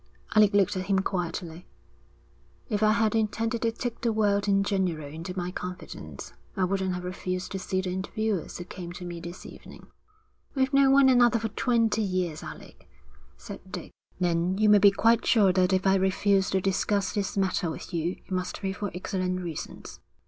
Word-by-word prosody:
Alec 210 -2 +6
looked 200 0 +3
at 185 0 -3
him 195 -1 +2
quietly. 175 -2 -3 1.0
'If 210 -2 -1
I 215 0 +5
had 220 -2 +2
intended 225 +1 0
to 230 - +1
take 240 +1 -5
the 235 - +1
world 205 -2 +1
in 195 0 +3
general 185 -6 -1
into 165 +5 -7
my 180 0 -2
confidence, 180 0 -8 0.2
I 190 - +2
wouldn't 190 0 0
have 180 - -5
refused 185 0 -4
to 195 - -3
see 185 0 -1
the 185 -1 -3
interviewers 200 +1 -2
who 175 - -6
came 175 -1 -8
to 180 0 -8
me 175 -1 -6
this 175 +1 -9
evening.' - - -12 0.7
'We've 265 0 +1
known 275 -1 +5
one 275 0 +6
another 245 -2 +5
for 225 0 -2
twenty 230 0 +1
years, 185 -6 -1
Alec,' - - -11 0.5
said - - -9
Dick. - - -7 0.3
'Then 175 +1 +1
you 215 0 +4
may 210 0 +7
be 200 - +8
quite 225 +3 +3
sure 200 -6 +4
that 185 0 +3
if 190 0 +1
I 190 - +5
refuse 190 +1 +2
to 190 - +1
discuss 195 +1 0
this 200 -1 -2
matter 185 -3 +1
with 160 - -7
you, 170 +1 0
it - - -20
must 185 -1 -2
be 190 -1 -2
for 205 +1 -4
excellent 185 0 -2
reasons.' 170 -4 -7
190 Hz, 190 wpm, -27 LUFS, 180-215 Hz, 1.0 s, be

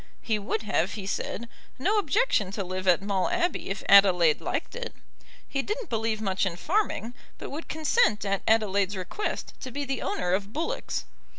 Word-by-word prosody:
He 220 -2 0
would 210 +2 -2
have, 200 -2 0
he 205 -3 -6
said, 225 +3 -3 0.3
no 400 +11 +2
objection 410 - +2
to 200 - -2
live 185 +1 -4
at 180 +1 +4
Maule 200 - 0
Abbey 355 - 0
if 195 0 -3
Adelaide 180 -6 +6
liked - - -3
it. - - -5 0.5
He 275 - -1
didn't 425 - -4
believe 225 -1 0
much 190 -2 0
in 185 -3 0
farming, 245 - -1 0.2
but - - -7
would 305 +4 -6
consent 310 - +2
at 195 -1 0
Adelaide's 200 -3 +2
request 190 - -4
to 260 - -6
be 285 +3 -3
the 270 -2 -2
owner 180 0 -1
of 200 +2 -1
bullocks. 315 +7 -3
215 Hz, 180 wpm, -27 LUFS, 195-300 Hz, 0.5 s, Adelaide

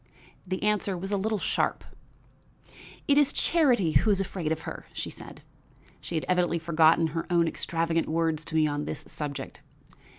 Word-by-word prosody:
The 185 +2 -3
answer 210 -3 +1
was 195 +3 -5
a - - +2
little 215 +2 0
sharp. - - -1 1.2
"It 285 0 +5
is 290 -1 +3
Charity 250 - +2
who 215 - +3
is 200 -2 +3
afraid 185 -5 -3
of 160 - -1
her," - - -8
said - - -7
she. - - -31 0.6
She 170 - -6
had 155 - -1
evidently 180 -2 +2
forgotten 165 0 +4
her 165 - -3
own 170 -1 +3
extravagant 165 0 -1
words 160 -1 0
to 160 - -6
me 155 -1 +4
on 145 0 -2
this - - -5
subject. 145 -2 -6
170 Hz, 170 wpm, -27 LUFS, 160-200 Hz, 1.2 s, It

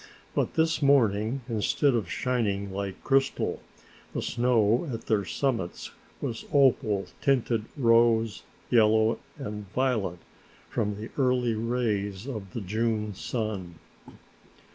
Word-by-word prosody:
But - - -1
this 160 0 +2
morning, 120 -3 +3
instead 120 +4 +1
of 110 -7 -1
shining 100 -6 -1
like 100 -1 -5
crystal, 135 0 +1 0.6
the - - 0
snow 120 +3 +2
at 115 - -4
their 105 -3 +1
summits 115 -7 -2 0.3
was 115 -1 -3
opal 120 -8 +3 0.2
tinted 120 -5 +1
rose, 115 -3 +3 0.3
yellow 110 -1 +4 0.2
and 105 -7 -6
violet 120 -9 0 0.5
from 105 0 -1
the 110 +3 -8
early 125 -3 +2
rays 110 -3 -1
of 105 -8 -6
the 115 - -3
June 105 +1 -1
sun. 100 -5 -4
115 Hz, 115 wpm, -27 LUFS, 105-125 Hz, 0.6 s, yellow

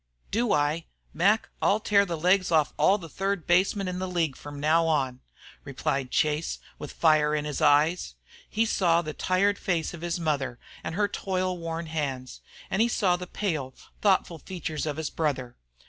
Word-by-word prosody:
"Do 230 +2 +1
I? 150 +3 +1 0.3
Mac, 200 +7 +2
I'll 205 - +3
tear 200 -2 +3
the 170 -2 -3
legs 185 +3 +2
off 155 -3 +3
all 200 - +4
the 170 -5 -9
third 195 +1 -2
basemen 190 +3 +2
in 180 0 -3
the 185 - -2
league 165 -6 0
from 145 -1 -9
now 160 +3 +3
on," 135 -5 0 0.4
replied 135 -1 -2
Chase, 150 +4 0 0.2
with - - -7
fire 155 -2 +3
in 150 -1 -2
his 150 -1 -3
eye. 150 +4 +5 0.5
He 225 +1 +1
saw 175 -6 +2
the 155 -1 -5
tired 195 +5 +1
face 170 -5 -1
of 170 - -9
his 175 0 -2
mother 140 -6 -1 0.3
and 160 - -4
her 205 +1 +2
toil 185 -2 -2
worn 165 -1 -4
hands, 140 -5 -4 0.3
and 190 - +2
he 235 - +4
saw 195 -6 +2
the 180 0 -6
pale, 155 -12 -3 0.3
thoughtful 185 -4 +2
features 160 -2 -4
of 150 -1 -3
his 160 -2 -3
brother. 135 -6 -2
165 Hz, 180 wpm, -27 LUFS, 150-185 Hz, 0.5 s, eye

